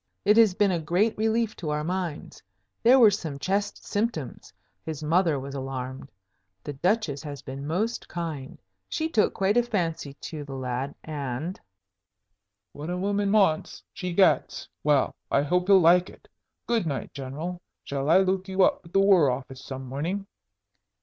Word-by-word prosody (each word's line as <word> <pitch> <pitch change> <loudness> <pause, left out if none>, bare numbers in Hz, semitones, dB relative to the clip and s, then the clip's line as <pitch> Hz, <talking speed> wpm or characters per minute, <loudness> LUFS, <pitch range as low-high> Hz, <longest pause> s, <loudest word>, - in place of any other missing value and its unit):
"It 210 - +5
has 220 -5 +6
been 205 -1 +3
a 175 - 0
great 180 +8 +1
relief 220 0 0
to 160 - -4
our 150 0 -1
minds. 175 -2 -4 0.4
There 250 +3 +6
were 225 -5 +7
some 160 -8 -4
chest 200 +7 -2
symptoms; 205 - -3 0.3
his 155 -1 -5
mother 165 -1 +2
was 135 +1 -7
alarmed. 130 0 -5 0.5
The 145 - -5
Duchess 165 -2 0
has 145 -2 -8
been 135 +2 -6
most 210 +9 -2
kind; 160 -6 -5 0.3
she 320 - -1
took 225 -10 +1
quite 195 +4 +2
a - - +6
fancy 170 -11 -2
to 150 +1 -7
the 135 -1 -8
lad, 130 +1 -3
and 150 +3 -4 0.6
" 100 -1 -56
"What 150 +3 -7
a 180 - -2
woman 200 +1 0
wants 195 -7 +2
she 180 -1 -4
gets. 190 +2 +2 0.2
Well, 145 -3 +3 0.2
I 140 - +2
hope 180 +5 +1
he'll 195 -1 +7
like 175 +2 +5
it. - - -17 0.4
Good 230 -7 0
night, 140 -4 -4
General. 150 +7 -5 0.2
Shall 140 +1 -3
I 170 - +7
look 190 0 0
you 190 0 +2
up - - +3
at 170 - -16
the 195 - +4
War 190 -7 +5
Office 130 +1 -5
some 130 -1 -7
morning?" 165 +10 -3
165 Hz, 170 wpm, -26 LUFS, 140-195 Hz, 0.6 s, were